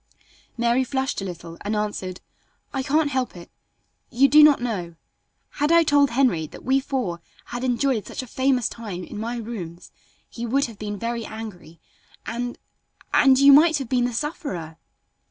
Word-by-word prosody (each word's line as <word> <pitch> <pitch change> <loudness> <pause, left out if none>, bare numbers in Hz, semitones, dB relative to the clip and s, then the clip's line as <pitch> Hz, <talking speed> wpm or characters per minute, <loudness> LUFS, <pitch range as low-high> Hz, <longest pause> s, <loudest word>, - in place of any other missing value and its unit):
Mary 235 +2 +2
flushed 265 -2 -2
a - - -4
little 170 -2 -8
and 210 +1 -2
answered, 205 -3 -3 0.5
"I 270 - -1
can't 295 +2 +1
help 255 -8 -2
it. 170 - -12 0.6
You 265 +4 +4
do 300 +2 +7
not 300 -2 +7
know. 190 -9 -4 0.6
Had 295 +2 0
I 335 0 +6
told 285 -2 +4
Henry 235 - +1
that - - -13
we 265 +1 +2
four 250 -11 -3 0.2
had 245 +1 -6
enjoyed 250 -4 0
such - - -5
a - - -8
famous 260 -1 +1
time 205 -6 -7
in 205 - -8
my 235 +2 -3
rooms 195 -7 -7 0.4
he 235 - -8
would 270 +4 +1
have 225 -4 -10
been 205 -1 -4
very 230 +2 -3
angry, 205 -8 -9 0.5
and 245 +1 -4 0.6
and 265 -2 +6
you 280 +1 +8
might 315 +2 +6
have 270 -5 -5
been 245 -2 +2
the 245 - -1
sufferer." 225 - -4
240 Hz, 170 wpm, -23 LUFS, 205-270 Hz, 0.6 s, you